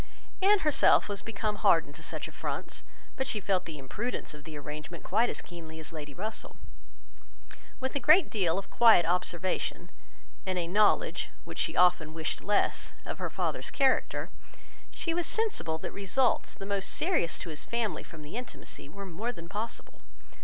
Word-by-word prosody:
Anne 405 Hz, +2 st, +6 dB
herself 300 Hz, -2 st, +5 dB
was 205 Hz, -2 st, -2 dB
become 215 Hz, -1 st, -2 dB
hardened 165 Hz, -7 st, +4 dB
to -, -, -10 dB
such -, -, -4 dB
affronts; -, -, -5 dB, 0.3 s
but 265 Hz, -, -1 dB
she 215 Hz, -, 0 dB
felt 190 Hz, -2 st, +1 dB
the 160 Hz, -2 st, -6 dB
imprudence 205 Hz, -, -4 dB
of 150 Hz, 0 st, -12 dB
the 155 Hz, -2 st, -7 dB
arrangement 150 Hz, +3 st, -7 dB
quite 225 Hz, +5 st, +2 dB
as -, -, -4 dB
keenly 160 Hz, -2 st, -9 dB
as 160 Hz, +1 st, -8 dB
Lady 150 Hz, -2 st, -6 dB
Russell. 215 Hz, +8 st, -5 dB, 1.2 s
With 260 Hz, 0 st, -2 dB
a -, -, +2 dB
great 310 Hz, +8 st, +6 dB
deal 185 Hz, -5 st, +2 dB
of 195 Hz, -, -5 dB
quiet 225 Hz, -7 st, +7 dB
observation, 180 Hz, +1 st, -1 dB, 0.5 s
and 185 Hz, -1 st, -1 dB
a 175 Hz, -, 0 dB
knowledge, 205 Hz, +4 st, +3 dB
which -, -, -7 dB
she -, -, 0 dB
often 170 Hz, -3 st, +4 dB
wished 160 Hz, -1 st, -2 dB
less, 205 Hz, +1 st, +1 dB
of -, -, -5 dB
her -, -, -2 dB
father's -, -, -2 dB
character, 270 Hz, -2 st, +1 dB, 0.6 s
she 330 Hz, -, -2 dB
was 345 Hz, 0 st, 0 dB
sensible 410 Hz, -, +1 dB
that -, -, -5 dB
results 230 Hz, +6 st, +1 dB
the 195 Hz, -, -7 dB
most 200 Hz, -1 st, +1 dB
serious 330 Hz, -, +1 dB
to 175 Hz, -, -5 dB
his 155 Hz, -, -3 dB
family 235 Hz, -3 st, -1 dB
from 155 Hz, -2 st, -11 dB
the 150 Hz, +7 st, -8 dB
intimacy 245 Hz, -, -7 dB
were 200 Hz, +5 st, -8 dB
more 195 Hz, +7 st, -3 dB
than 170 Hz, -7 st, -10 dB
possible. 210 Hz, +5 st, -5 dB
195 Hz, 175 wpm, -30 LUFS, 165-230 Hz, 1.2 s, quiet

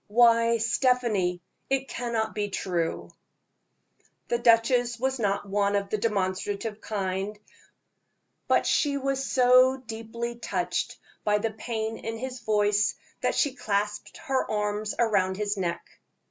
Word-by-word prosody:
Why, 230 Hz, +1 st, +5 dB
Stephanie, 225 Hz, -7 st, +1 dB, 0.3 s
it 270 Hz, 0 st, 0 dB
cannot 230 Hz, -4 st, -2 dB
be 205 Hz, 0 st, -2 dB
true." 175 Hz, -4 st, -2 dB, 1.2 s
The 235 Hz, -, +1 dB
duchess 235 Hz, +1 st, +3 dB
was 265 Hz, +1 st, -1 dB
not 200 Hz, -1 st, 0 dB
one 200 Hz, 0 st, +1 dB
of 200 Hz, 0 st, -1 dB
the 215 Hz, -, 0 dB
demonstrative 205 Hz, +1 st, -2 dB
kind, 195 Hz, 0 st, -3 dB, 1.1 s
but -, -, +3 dB
she 285 Hz, -2 st, +2 dB
was 270 Hz, 0 st, -1 dB
so 255 Hz, 0 st, +5 dB
deeply 235 Hz, 0 st, -6 dB
touched -, -, -2 dB, 0.3 s
by 210 Hz, -1 st, +3 dB
the 220 Hz, +1 st, -1 dB
pain 220 Hz, 0 st, -4 dB
in 225 Hz, 0 st, -5 dB
his 255 Hz, +1 st, -5 dB
voice, 210 Hz, -2 st, +2 dB, 0.3 s
that -, -, +1 dB
she 285 Hz, -4 st, +2 dB
clasped 210 Hz, -4 st, -2 dB
her 270 Hz, -3 st, 0 dB
arms 210 Hz, 0 st, -1 dB
round 195 Hz, -5 st, +2 dB
his 205 Hz, 0 st, -1 dB
neck. 175 Hz, -3 st, -3 dB
220 Hz, 130 wpm, -27 LUFS, 205-240 Hz, 1.2 s, Why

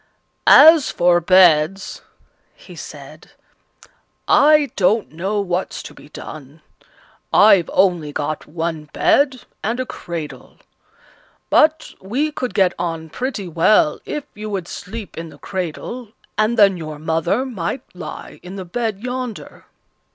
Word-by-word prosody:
"As 315 Hz, 0 st, +8 dB
for 175 Hz, 0 st, +3 dB
beds," 185 Hz, 0 st, +3 dB, 0.5 s
he -, -, -14 dB
said, -, -, -11 dB, 0.9 s
"I 295 Hz, -3 st, +5 dB
don't 205 Hz, +3 st, +1 dB
know 190 Hz, +6 st, -2 dB
what's 180 Hz, -1 st, -3 dB
to -, -, -10 dB
be -, -, -16 dB
done. 150 Hz, +1 st, -11 dB, 0.7 s
I've 200 Hz, -5 st, +5 dB
only 175 Hz, -6 st, +2 dB
got 150 Hz, +1 st, -4 dB
one 160 Hz, -1 st, -4 dB
bed 270 Hz, -3 st, +2 dB, 0.2 s
and 230 Hz, +4 st, -2 dB
a 255 Hz, -, -1 dB
cradle; 170 Hz, -9 st, -8 dB, 0.9 s
but 315 Hz, +1 st, +3 dB
we 260 Hz, +11 st, -1 dB
could 250 Hz, -9 st, -5 dB
get 190 Hz, -4 st, +3 dB
on 165 Hz, -2 st, -4 dB
pretty 245 Hz, -, -4 dB
well 165 Hz, -1 st, +3 dB
if 300 Hz, -, -5 dB
you 215 Hz, +1 st, -7 dB
would 190 Hz, -4 st, -4 dB
sleep 210 Hz, -1 st, -8 dB
in 165 Hz, 0 st, -7 dB
the 145 Hz, -, -15 dB
cradle, 200 Hz, +8 st, -6 dB, 0.2 s
and 215 Hz, +2 st, +1 dB
then 200 Hz, -3 st, +5 dB
your 155 Hz, -2 st, -7 dB
mother 165 Hz, -, -1 dB
might 240 Hz, +1 st, -4 dB
lie 180 Hz, -4 st, -9 dB
in 180 Hz, +2 st, -9 dB
the 190 Hz, -2 st, -6 dB
bed 220 Hz, +2 st, -3 dB
yonder." 250 Hz, -2 st, -6 dB
190 Hz, 130 wpm, -19 LUFS, 165-235 Hz, 0.9 s, As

